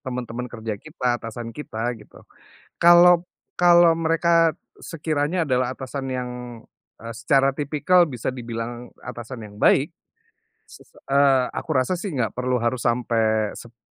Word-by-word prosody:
Teman-teman 125 -2 -5
kerja 110 -3 -6
kita, 125 -6 -2
atasan 115 +1 -7
kita, 120 -4 -4
gitu. - - -17 0.5
Kalau 175 0 +6 0.3
kalau 175 -2 +5
mereka, 165 0 +2 0.2
sekiranya 155 +1 -2
adalah 130 -3 0
atasan 135 +1 -6
yang, 125 -1 -3 0.7
eee, 115 +1 -7
secara 135 +3 +3
tipikal 155 +5 +3
bisa 125 -6 -4
dibilang 120 -1 -6
atasan 120 -1 -8
yang 105 -1 -11
baik. 140 +6 +3 0.8
Se - - -16
se - - -28
eee, 135 -2 +3
aku - - -6
rasa 170 +8 0
sih 185 -9 -5
nggak 115 -4 -1
perlu 125 0 -1
harus 120 +1 0
sampai 115 -3 0
seb 120 0 -12
130 Hz, 140 wpm, -23 LUFS, 120-155 Hz, 0.8 s, Kalau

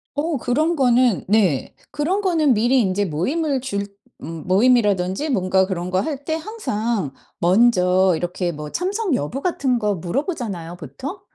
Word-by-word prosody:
어 305 +1 -1
그런 305 +8 +1
거는 250 - +3
네 190 -10 +2 0.2
그런 345 +8 -1
거는 320 -8 +2
미리 240 +4 +3
인제 200 -1 0
모임을 270 - -1
줄 200 -6 -3 0.3
음 165 +2 -8
모임이라든지 205 +1 +2
뭔가 190 -5 +2
그런 180 -2 -4
거 185 - +2
할 285 +5 -4
때 315 - -1
항상 235 - -3 0.3
먼저 185 -2 +4
이렇게 175 +1 -2
뭐 150 -2 -7
참석 385 -1 -1
여부 250 - -2
같은 270 -8 0
거 210 -3 0
물어보잖아요, 185 - -4
보통. 180 - -8
225 Hz, 290 characters per minute, -21 LUFS, 185-290 Hz, 0.3 s, 먼저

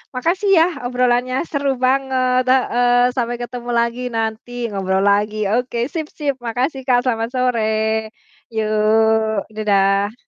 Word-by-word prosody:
makasih, 350 - 0
ya, 325 - +6 0.2
obrolannya 250 0 +1 0.2
seru 280 -1 -1 0.2
banget, 255 -1 +1
heeh. 245 -1 +3
Sampai 240 -2 -1
ketemu 245 0 -6
lagi 235 +1 -1
nanti, 225 +1 -3 0.2
ngobrol 190 -1 -1
lagi. 205 +1 +2 0.2
Oke, 245 -1 -3 0.2
sip 320 -3 -3
sip, 285 -3 -1
makasih, 255 +4 -2
Kak, 245 -1 +4
selamat 230 -3 -1
sore. 250 -3 +1 0.9
Yuk, 220 0 +2
dadah. 200 -1 +1
245 Hz, 125 wpm, -19 LUFS, 220-255 Hz, 0.9 s, ya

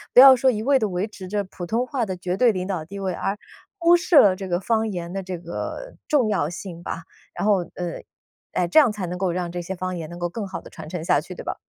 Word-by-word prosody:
不 - - +10
要 265 0 +11
说 260 +1 +3
一 215 -3 -1
味 270 +2 +4
地 215 -3 0
维 180 +3 -1
持 195 -3 -10
着 205 +2 -1
普 185 -2 -8
通 235 +6 0
话 255 -4 -2
的 185 -1 -4
绝 180 0 -2
对 245 +1 +5
领 185 -3 -3
导 185 -5 -2
地 200 +5 -9
位， 190 -2 -2
而 195 +3 -2 0.4
忽 345 -1 +5
视 345 0 0
了 200 -8 +8
这 190 -1 -5
个 175 0 0
方 220 +2 +1
言 175 -3 -5
的 195 +1 -3
这 185 -1 -5
个 175 - -6
重 270 -8 +3
要 170 -8 +1
性 175 0 -7
吧。 165 - -5 0.3
然 - - -2
后， 200 -4 +3
呃 175 -2 -4 0.5
哎， 180 - +1
这 180 - +6
样 285 -5 +6
才 210 -3 -4
能 180 +1 -4
够 185 0 0
让 175 -1 -2
这 175 0 -4
些 185 +3 -5
方 185 0 -3
言 160 -2 -6
能 175 - -8
够 175 0 -1
更 205 +3 -5
好 190 - -6
地 - - -13
传 160 -3 -10
承 165 0 -5
下 165 - +3
去， 180 +5 -9
对 - - -8
吧？ - - -4
190 Hz, 300 characters per minute, -23 LUFS, 175-220 Hz, 0.5 s, 要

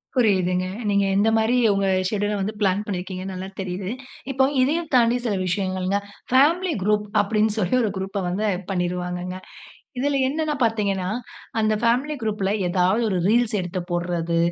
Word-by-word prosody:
புரியுதுங்க. 185 -6 +2 0.2
நீங்க 200 -1 +3
எந்தமாரி 225 +3 +3 0.2
உங்க 195 0 +1 0.2
ஷெட்யூல் 205 0 -1
ல 205 - -2
வந்து 210 +3 -2
பிளான் 200 +1 +2
பண்ணியிருக்கீங்கன்னு 185 0 -4
நல்லா 190 +1 -5
தெரியுது. 185 +1 -4 0.4
இப்போ 265 +1 +4 0.2
இதையும் 310 +4 0
தாண்டி 240 0 +4
சில 220 - +1
விஷயங்கள்ங்க. 185 +1 0 0.4
/பேமிலி 330 +6 +4
குரூப் 210 0 +1
அப்பிடின்னு 215 +1 +1
சொல்லி 185 +4 +1
ஒரு 215 - +1
குரூப்ப 195 +1 -3
வந்து 205 +4 -1
இது 180 0 -8
பண்ணிருவாங்கங்க. 180 0 -2 0.6
இதில 280 +1 +1
என்னன்னு 305 +2 -1
பார்த்தீங்கனா, 200 -5 +1 0.5
அந்த 215 0 +2
ஃபேமிலி 255 +6 +2
குரூப்ல 210 -3 -1 0.2
ஏதாவது 185 +5 +2
ஒரு 185 -3 0
ரீல்ஸ் 235 +1 +3
எடுத்து 180 +1 -3
போடுறது, 175 -1 -1
200 Hz, 150 wpm, -23 LUFS, 185-225 Hz, 0.6 s, இப்போ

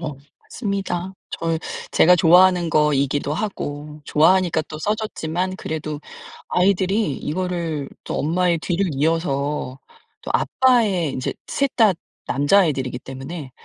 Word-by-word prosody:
어 155 -4 -4 0.3
맞습니다. 195 -4 -3 0.2
저 165 -1 -1 0.3
제가 180 +2 +5
좋아하는 180 0 +5
거이기도 145 -1 +1
하고 150 -6 -5
좋아하니까 165 +2 +3
또 155 - -9
써 210 +7 0
줬지만 185 -4 -3
그래도 155 -3 -5 0.5
아이들이 190 0 +2
이거를 165 -3 -3 0.2
또 - - -4
엄마의 175 +3 +1
뒤를 180 +4 -1
이어서 145 -3 -1 0.4
또 - - -7
아빠의 215 - +2
인제 130 - -3
3 280 -1 -1
다 220 -5 +5 0.3
남자애들이기 140 -4 +2
때문에 135 +2 -8
165 Hz, 275 characters per minute, -21 LUFS, 150-185 Hz, 0.5 s, 제가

